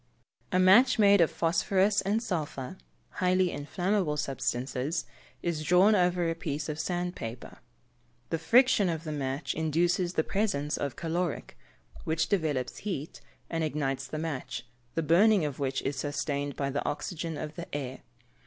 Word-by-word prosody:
_ - - -39 0.5
A 185 - +2
match 205 +9 +6
made 200 -3 +6
of 165 - +5
phosphorous 190 +4 +2
and 210 +4 0
sulphur 150 - -3 0.4
(highly 185 0 +3
inflammable 175 +2 -1
substances) 135 +2 -2 0.4
is 170 -3 -1
drawn 180 +6 +5
over 180 -3 +2
a 165 - +1
piece 150 -2 -4
of 150 0 -4
sand 175 +1 -2
paper; 115 +2 -7 0.7
the 165 - 0
friction 230 +2 +4
of 165 -1 -3
the 155 - -4
match 135 -2 -2
induces 175 +3 +1
the 160 - +1
presence 155 -9 -1
of 140 -3 -3
caloric, 170 0 -3 0.5
which 160 0 0
developes 150 -10 0
heat, 175 -7 -5 0.3
and 165 -1 -2
ignites 135 -4 -2
the 155 - -5
match, 150 -6 -4 0.3
the 165 - 0
burning 185 +3 +5
of 145 -2 -4
which 135 -1 -1
is 135 0 -2
sustained 145 0 -2
by 140 -1 -2
the 145 - -2
oxygen 165 +1 -3
of 150 +1 -5
the 170 0 -8
air. 135 -3 -4
160 Hz, 155 wpm, -29 LUFS, 145-180 Hz, 0.7 s, match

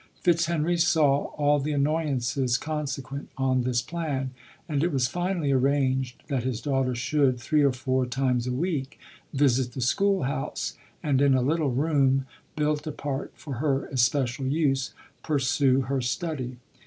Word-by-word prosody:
Fitzhenry 170 -1 +2
saw 150 -4 +3
all 145 0 +3
the 150 +2 -2
annoyances 140 -4 +1
consequent 140 -3 -4
on 130 -1 +2
this 120 -1 0
plan, 140 -3 -3 0.4
and 145 -4 0
it 175 - +1
was 130 -3 +1
finally 175 -1 -1
arranged 130 -1 +1
that 135 -4 -1
his 125 -2 -2
daughter 135 -1 0
should, 130 +1 +1
three 150 +5 +1
or 140 -1 +4
four 130 0 -1
times 125 -1 0
a - - -1
week, 140 -1 -2 0.3
visit 130 -3 +2
the - - -6
school 195 +10 +2
house, 135 - -3 0.3
and 140 -3 +2
in 140 -2 +5
a 130 - +2
little 155 +2 +1
room, 135 -1 +2 0.3
built 150 0 0
apart 145 -2 -4
for 140 -5 -7
her 140 0 0
especial 130 0 +1
use, 135 -2 +1 0.3
pursue 135 -2 +2
her 135 +1 -1
study. 130 -1 -3
135 Hz, 150 wpm, -26 LUFS, 130-150 Hz, 0.4 s, in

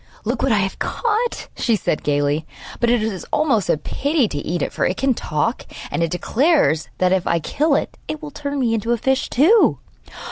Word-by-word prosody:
'Look 235 +2 -1
what 270 - +2
I 215 - +4
have 190 -1 -1
caught,' 465 +1 -1
she 230 - +1
said 175 - -1
gaily; 145 +2 0 0.3
'but 235 - +2
it 240 -2 +2
is 210 -5 -3
almost 260 - +1
a - - +3
pity 280 - 0
to 145 - -3
eat 165 +1 -2
it, - - -3
for - - -1
it 185 - 0
can 270 -1 +2
talk, 220 - -2 0.3
and - - -1
it 165 - +1
declares 225 - +2
that, 185 0 +2
if 190 -2 +1
I 170 - +2
kill 285 - +1
it, - - -2
it 310 - -4
will 300 -1 -8
turn 285 -1 -4
me 235 -3 +1
into 230 +1 0
a - - 0
fish 265 +3 0
too. 370 - +4
230 Hz, 215 wpm, -20 LUFS, 175-285 Hz, 0.3 s, I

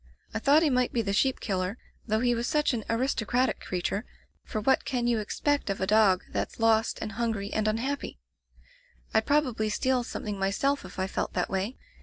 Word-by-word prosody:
I 225 - -1
thought 290 +7 +5
he 305 - +3
might 250 -1 +2
be 230 - +1
the 200 -1 -1
sheep 265 +5 +2
killer, 190 +1 -2 0.3
though 220 0 +1
he 245 -1 +3
was 235 +1 -1
such 300 -2 +2
an 225 -3 -2
aristocratic 250 +1 +1
creature, 185 +3 -2 0.4
for 215 - -4
what 265 +5 +2
can 245 -3 -1
you 240 -2 +2
expect 285 +5 -1
of 195 - -1
a 190 - +1
dog 200 -2 +4
that's - - -3
lost 225 0 +3
and 215 - -4
hun 230 +2 -1
gry 200 -2 -4
and 215 0 +1
unhappy? 245 - -2 1.0
Fd 220 - +2
probably 255 -7 +2
steal 255 +3 +1
some - - -6
thing 205 -2 -4
myself 250 +9 0
if - - -11
I 190 - 0
felt 190 - -3
that 180 - -1
way. 195 +6 -2
225 Hz, 205 wpm, -28 LUFS, 205-255 Hz, 1.0 s, thought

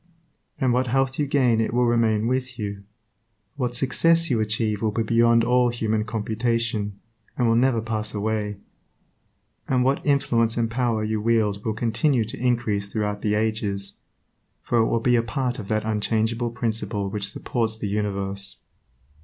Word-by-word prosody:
And 130 -4 +2
what 125 +1 +1
health 135 +2 0
you 145 - +1
gain 125 -5 +3
it 115 - -1
will 125 0 +3
remain 115 -2 +2
with 130 0 -2
you; 100 -3 -5 0.7
what 125 -3 -2
success 165 +5 +3
you 115 - +2
achieve 105 -1 0
will 110 - +1
be 115 +2 -1
beyond 115 +1 +4
all 125 +1 +3
human 110 -2 -1
computation, 110 -1 -2 0.4
and 120 - +2
will 115 - +3
never 120 -1 +3
pass 110 -2 -2
away; 105 -1 -2 1.1
and 125 -1 +2
what 135 +2 +1
influence 115 -5 +1
and 115 -1 0
power 115 -3 0
you 110 0 -1
wield 105 -3 +1
will 110 -2 -2
continue 120 +2 +1
to 110 - -8
increase 120 -5 0
throughout 105 -1 -2
the 105 -1 +1
ages, 105 -2 -2 0.6
for 120 - +1
it 115 - +3
will 115 - 0
be 125 +1 +3
a 115 - +4
part 125 +1 -2
of 100 - -7
that 110 +1 -1
unchangeable 110 +2 0
Principle 115 -3 -2
which 100 0 -1
supports 110 +1 -1
the 110 - -4
universe. 100 -1 -1
115 Hz, 165 wpm, -24 LUFS, 105-120 Hz, 1.1 s, beyond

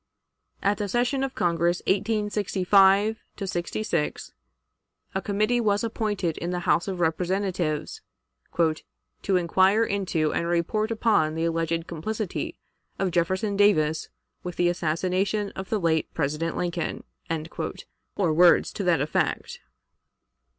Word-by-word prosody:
At 205 +1 +1
the 205 - -1
session 245 +5 +1
of 270 -1 -3
Congress 170 0 +1
of - - -32
1865 205 0 +3 0.2
'66, 180 -3 -2 0.8
a 190 - -1
committee 215 +4 +1
was 205 -1 +1
appointed 210 -7 -2
in 170 - -3
the 180 0 -2
House 170 - +2
of 190 -2 -3
Representatives 175 -1 -1 0.6
"to 165 +3 -2
inquire 190 +5 +3
into 185 -7 0
and 170 - -1
report 175 +6 0
upon 215 -9 +2
the 165 +1 0
alleged 165 0 -1
complicity 205 +5 -4 0.4
of 195 -2 0
Jefferson 190 +4 0
Davis 160 -7 +3 0.3
with 180 -1 -6
the 175 0 +2
assassination 185 +5 -1
of 190 0 -7
the 215 - 0
late 160 -3 +1
President 155 +2 -1
Lincoln," 175 -1 -2 1.1
or 175 -6 +1
words 175 +2 +5
to 200 - -3
that 170 -6 +2
effect. 150 - -1
185 Hz, 120 wpm, -26 LUFS, 170-205 Hz, 1.1 s, words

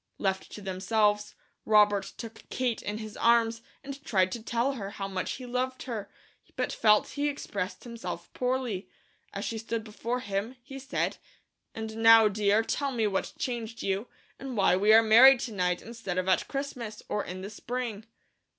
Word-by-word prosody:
Left 190 -1 -2
to 210 - -8
themselves, 205 +2 +1 0.3
Robert 210 -2 +4
took 230 -1 -10
Kate 250 -3 -1
in 210 +1 -4
his 215 -1 -7
arms 230 -1 +3 0.2
and 275 +1 -8
tried 185 -6 +2
to 235 - -4
tell 235 +4 0
her 200 -7 -5
how 200 -1 -5
much 190 -1 -3
he 255 - -8
loved 255 +1 -2
her, 220 -6 -5 0.5
but - - -1
felt 210 -1 +4
he 290 0 -1
expressed 200 -9 -4
himself 185 -8 -7
poorly. 250 -6 -2 0.4
As - - -4
she 225 - -3
stood 225 0 -3
before 230 +3 -4
him, 200 +3 -3
he 270 +2 -9
said: 270 +2 -2 0.6
"And 220 0 -5
now, 225 -1 +8
dear, 210 +1 +2
tell 280 +4 -1
me 230 -4 0
what 195 -2 -1
changed 235 -2 -4
you, 195 +4 -1 0.3
and 265 -3 -6
why 190 -2 +4
we 205 +3 +4
are 225 +1 +8
married 245 +4 +8
to 240 - -4
night 180 -3 0
instead 225 -6 -5
of 185 0 0
at 185 - +2
Christmas, 250 -6 -5
or 210 - -1
in 185 +1 -7
the 200 +2 -7
spring." 230 -1 -5
220 Hz, 180 wpm, -29 LUFS, 200-245 Hz, 0.6 s, now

